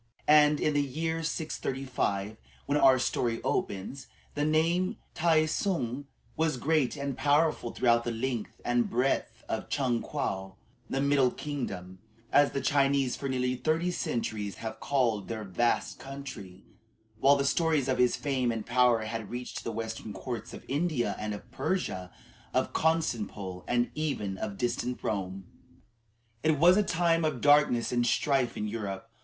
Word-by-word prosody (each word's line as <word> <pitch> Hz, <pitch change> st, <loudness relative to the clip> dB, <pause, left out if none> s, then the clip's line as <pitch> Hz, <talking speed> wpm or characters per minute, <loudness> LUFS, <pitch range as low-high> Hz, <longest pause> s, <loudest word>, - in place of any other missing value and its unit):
And 150 Hz, -1 st, +6 dB
in 150 Hz, -, +1 dB
the 145 Hz, -, +3 dB
year 160 Hz, +4 st, -2 dB
635, 130 Hz, -10 st, -2 dB, 0.3 s
when 145 Hz, -, 0 dB
our 130 Hz, -2 st, +6 dB
story 120 Hz, -2 st, 0 dB
opens, 100 Hz, +8 st, -2 dB, 0.3 s
the 145 Hz, -, -1 dB
name 165 Hz, +4 st, +2 dB
of -, -, -7 dB, 0.2 s
Tai 160 Hz, -2 st, +3 dB
tsung 145 Hz, -, -1 dB, 0.3 s
was 160 Hz, -4 st, +1 dB
great 150 Hz, 0 st, +1 dB
and 140 Hz, -1 st, -3 dB
powerful 150 Hz, -3 st, +2 dB
throughout 115 Hz, -1 st, +2 dB
the 120 Hz, -, -2 dB
length 115 Hz, -1 st, -3 dB
and 120 Hz, 0 st, +2 dB
breadth 125 Hz, +4 st, 0 dB
of -, -, -3 dB
Chung 125 Hz, -4 st, 0 dB
Kwoh 95 Hz, -9 st, -3 dB, 0.3 s
the 135 Hz, -, 0 dB
"Middle 140 Hz, -2 st, +4 dB
Kingdom," 95 Hz, -12 st, -5 dB, 0.3 s
as 145 Hz, 0 st, +5 dB
the 140 Hz, -, -2 dB
Chinese 140 Hz, -2 st, +2 dB
for 140 Hz, -, -4 dB
nearly 125 Hz, -1 st, 0 dB
thirty 160 Hz, +6 st, 0 dB
centuries 110 Hz, -, -2 dB
have 110 Hz, -1 st, -6 dB
called 120 Hz, -8 st, 0 dB
their 110 Hz, -1 st, -4 dB
vast 105 Hz, +5 st, 0 dB
country 130 Hz, -9 st, -8 dB, 0.6 s
while 140 Hz, +4 st, +6 dB
the 140 Hz, 0 st, 0 dB
stories 155 Hz, -1 st, +2 dB
of 130 Hz, -1 st, 0 dB
his 125 Hz, -1 st, +4 dB
fame 130 Hz, -4 st, 0 dB
and 115 Hz, -2 st, -4 dB
power 120 Hz, -2 st, +3 dB
had 110 Hz, -1 st, -5 dB
reached 125 Hz, +1 st, -5 dB
to -, -, -11 dB
the 115 Hz, -, -3 dB
western 110 Hz, -1 st, -5 dB
courts 115 Hz, +4 st, -5 dB
of -, -, -10 dB
India 140 Hz, -7 st, 0 dB
and 105 Hz, 0 st, -3 dB
of 120 Hz, +4 st, -12 dB
Persia, 105 Hz, -, -2 dB, 0.4 s
of -, -, +1 dB
Constantinople, 105 Hz, -, -1 dB
and 120 Hz, 0 st, +1 dB
even 105 Hz, -11 st, -2 dB
of 100 Hz, -2 st, -4 dB
distant 120 Hz, 0 st, -2 dB
Rome. 95 Hz, -2 st, -3 dB, 1.0 s
It 155 Hz, -1 st, +2 dB
was 175 Hz, +5 st, +7 dB
a 210 Hz, -, +4 dB
time 170 Hz, -3 st, +2 dB
of 155 Hz, -5 st, 0 dB
darkness 145 Hz, -5 st, +4 dB
and 120 Hz, -1 st, +2 dB
strife 130 Hz, 0 st, +1 dB
in 105 Hz, -, -2 dB
Europe. 105 Hz, -3 st, -4 dB
130 Hz, 160 wpm, -29 LUFS, 115-150 Hz, 1.0 s, was